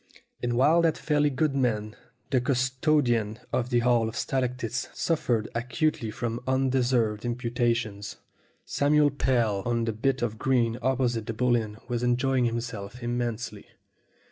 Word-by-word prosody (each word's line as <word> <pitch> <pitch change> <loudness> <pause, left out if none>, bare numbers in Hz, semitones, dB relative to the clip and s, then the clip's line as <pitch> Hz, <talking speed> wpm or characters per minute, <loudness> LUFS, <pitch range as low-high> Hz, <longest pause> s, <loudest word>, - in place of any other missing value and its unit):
And 120 0 -1
while 150 +8 +4
that 165 -2 +2
fairly 150 -1 +2
good 140 +1 0
man, 110 -5 0 0.4
the 130 -3 +3
custodian 130 -3 +1 0.2
of 125 -1 0
the 120 -2 +2
Hall 120 -2 +3
of 110 - -9
Stalactites, 125 -2 -2
suffered 120 -9 0
acutely 125 +2 -1
from 115 +1 -3
unde 130 0 +2
served 115 -4 +1
imputations, 120 -4 -1 0.5
Samuel 145 0 +3
Pell 120 -7 +1
on 120 -1 0
the 115 - -1
bit 130 +4 0
of 110 -2 -2
green 120 -3 +1
opposite 120 -3 0
the 115 - -2
Bull 125 +2 +2
Inn 110 -2 -2
was 120 -2 -2
enjoying 125 +1 +2
himself 115 -1 -4
immensely. 120 -3 -3
120 Hz, 145 wpm, -27 LUFS, 115-130 Hz, 0.5 s, while